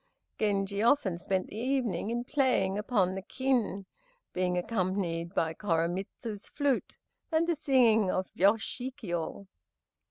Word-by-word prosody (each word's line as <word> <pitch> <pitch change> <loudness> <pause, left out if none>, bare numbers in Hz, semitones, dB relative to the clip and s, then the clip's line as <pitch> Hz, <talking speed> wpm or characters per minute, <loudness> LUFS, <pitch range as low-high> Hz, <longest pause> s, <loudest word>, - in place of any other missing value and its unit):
Genji 200 -1 0
often 225 -8 +3
spent 185 0 -1
the 210 - -9
evening 235 -6 0
in 240 +1 -1
playing 250 -9 +1
upon 205 -3 +1
the 195 - -4
Kin, 240 -4 -1 0.5
being 180 0 0
accompanied 180 -3 -1
by 160 0 +1
Koremitz's 190 +4 -2
flute 285 -3 0 0.4
and 320 +1 +3
the 340 - +2
singing 245 - +4
of 185 0 0
Yoshikiyo. 205 -3 -1
205 Hz, 120 wpm, -30 LUFS, 185-245 Hz, 0.5 s, singing